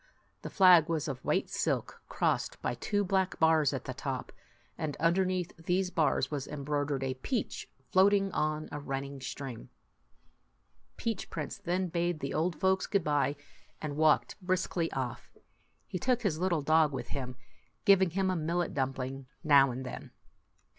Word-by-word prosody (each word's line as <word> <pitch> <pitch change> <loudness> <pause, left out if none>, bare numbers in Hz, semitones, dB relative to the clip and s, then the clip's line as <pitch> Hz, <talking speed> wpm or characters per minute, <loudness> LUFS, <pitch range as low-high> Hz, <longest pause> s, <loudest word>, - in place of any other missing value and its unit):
The - - -6
flag 180 -4 +6
was 160 -2 -1
of 130 -3 -5
white - - +1
silk, - - -1
crossed - - 0
by - - 0
two 205 - -1
black 190 -1 0
bars 160 -3 +4
at 135 - -4
the 130 - -4
top; 135 -1 -4 0.4
and 155 -3 -3
underneath 180 +1 +1
these 180 +2 +1
bars 155 -5 +1
was 140 -3 -3
embroidered 145 -1 -2
a 130 -1 -1
peach 215 - -3 0.2
floating 195 +1 +4
on 155 -1 -1
a 145 - -4
run 135 -1 -3
ning 140 -1 -8
stream. 130 -3 -6 1.3
Peach 225 -2 -3
Prince - - -5
then 185 -1 -1
bade 170 -1 -1
the 140 - -4
old 165 +2 0
folks 190 0 +2
good 200 - +1
by, 145 -1 +1 0.4
and 150 -2 -4
walked 155 +6 +2
briskly 180 -2 0
off. 130 -3 -5 0.5
He 185 - -4
took 250 +3 +1
his 165 -7 0
little 175 -4 +1
dog 155 0 +4
with 135 - -5
him, 130 -3 -4 0.5
giving 190 -2 +6
him 190 +2 0
a - - 0
millet 170 +2 -1
dumpling 135 0 -3 0.2
now 140 -3 +6
and 130 +1 -5
then. 125 - -7
155 Hz, 160 wpm, -31 LUFS, 140-185 Hz, 1.3 s, flag